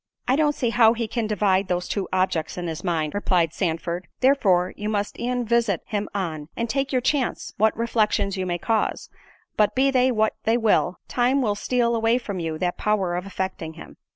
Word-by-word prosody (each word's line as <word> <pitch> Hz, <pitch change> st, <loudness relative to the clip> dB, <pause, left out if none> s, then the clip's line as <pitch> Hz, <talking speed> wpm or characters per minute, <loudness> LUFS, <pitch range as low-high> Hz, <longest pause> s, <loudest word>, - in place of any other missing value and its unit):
"I 255 Hz, -, +3 dB
don't 295 Hz, 0 st, +2 dB
see 240 Hz, -3 st, 0 dB
how 225 Hz, -1 st, +5 dB
he 230 Hz, -1 st, -3 dB
can 225 Hz, 0 st, -2 dB
divide 200 Hz, -2 st, +1 dB
those 180 Hz, -1 st, -1 dB
two 200 Hz, -2 st, -2 dB
objects 185 Hz, -4 st, 0 dB
in 175 Hz, -, -3 dB
his 165 Hz, 0 st, -5 dB
mind," 160 Hz, -5 st, -1 dB
replied 180 Hz, -5 st, +1 dB
Sandford, 170 Hz, 0 st, -2 dB
"therefore 195 Hz, -10 st, +3 dB
you 210 Hz, +1 st, -4 dB
must 205 Hz, -1 st, -2 dB
e'en 245 Hz, 0 st, -1 dB
visit 230 Hz, -5 st, +1 dB
him 210 Hz, -2 st, -3 dB
on, 160 Hz, -6 st, -3 dB
and 235 Hz, -, -1 dB
take 275 Hz, +3 st, -1 dB
your 255 Hz, -2 st, +1 dB
chance, 265 Hz, 0 st, -1 dB
what 220 Hz, +1 st, +2 dB
reflections 215 Hz, -4 st, +1 dB
you 185 Hz, -1 st, -3 dB
may 175 Hz, -1 st, -1 dB
cause—but, 220 Hz, -, -2 dB
be 270 Hz, +1 st, +3 dB
they 255 Hz, 0 st, +3 dB
what 220 Hz, -2 st, +1 dB
they 225 Hz, +2 st, +2 dB
will, 220 Hz, -5 st, +2 dB
time 255 Hz, +2 st, +2 dB
will 210 Hz, -3 st, +1 dB
steal 235 Hz, +2 st, 0 dB
away 225 Hz, +1 st, +2 dB
from 205 Hz, -7 st, -5 dB
you 160 Hz, -2 st, -3 dB
that 175 Hz, +1 st, -2 dB
power 200 Hz, -4 st, +1 dB
of 180 Hz, +2 st, -4 dB
affecting 185 Hz, -4 st, -4 dB
him." 165 Hz, -, -11 dB
210 Hz, 200 wpm, -24 LUFS, 180-235 Hz, -, how